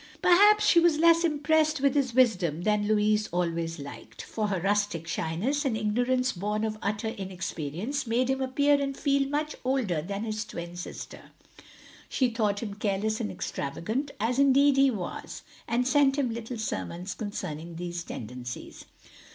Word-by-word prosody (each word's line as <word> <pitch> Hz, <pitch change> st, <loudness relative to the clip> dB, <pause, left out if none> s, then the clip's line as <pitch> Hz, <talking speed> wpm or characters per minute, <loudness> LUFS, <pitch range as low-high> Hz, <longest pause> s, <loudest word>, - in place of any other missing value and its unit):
Perhaps 415 Hz, +4 st, +6 dB
she 345 Hz, -, +6 dB
was 335 Hz, -2 st, +4 dB
less 335 Hz, +1 st, +5 dB
impressed 310 Hz, -1 st, +2 dB
with 275 Hz, 0 st, +2 dB
his 260 Hz, -5 st, 0 dB
wisdom 185 Hz, -, +2 dB
than 210 Hz, 0 st, +1 dB
Louis 210 Hz, 0 st, +2 dB
always 170 Hz, -1 st, -2 dB
liked; 140 Hz, -1 st, -9 dB
for 215 Hz, -1 st, -2 dB
her 195 Hz, -3 st, -1 dB
rustic 200 Hz, -3 st, 0 dB
sh)niess, 190 Hz, -, -1 dB
and 255 Hz, -6 st, 0 dB
ignorance 245 Hz, +4 st, +1 dB
bom 210 Hz, +4 st, -2 dB
of 215 Hz, -1 st, -2 dB
utter 210 Hz, +2 st, -1 dB
inexperience, 185 Hz, -, -4 dB
made 240 Hz, +3 st, +1 dB
him 265 Hz, 0 st, 0 dB
appear 285 Hz, +2 st, +2 dB
and 275 Hz, -1 st, -2 dB
feel 275 Hz, -1 st, +1 dB
much 300 Hz, +1 st, -2 dB
older 250 Hz, -, 0 dB
than 200 Hz, +5 st, -4 dB
his 215 Hz, -1 st, -3 dB
twin 170 Hz, -5 st, -7 dB
sister. 175 Hz, -, -8 dB, 0.8 s
She 255 Hz, -2 st, +1 dB
thought 215 Hz, -2 st, 0 dB
him 205 Hz, -3 st, -4 dB
careless 210 Hz, +1 st, -1 dB
and 105 Hz, -, -2 dB
extravagant, 140 Hz, -, -3 dB
as 235 Hz, +5 st, 0 dB
indeed 280 Hz, 0 st, +5 dB
he 275 Hz, 0 st, +6 dB
was, 200 Hz, -8 st, -5 dB, 0.2 s
and 245 Hz, +2 st, +1 dB
sent 280 Hz, 0 st, +4 dB
him 255 Hz, -5 st, 0 dB
little 230 Hz, +1 st, -5 dB
sermons 180 Hz, -, -4 dB
concerning 170 Hz, -6 st, -5 dB
these 175 Hz, 0 st, -4 dB
tendencies. 125 Hz, -2 st, -8 dB
220 Hz, 160 wpm, -28 LUFS, 180-270 Hz, 0.8 s, Perhaps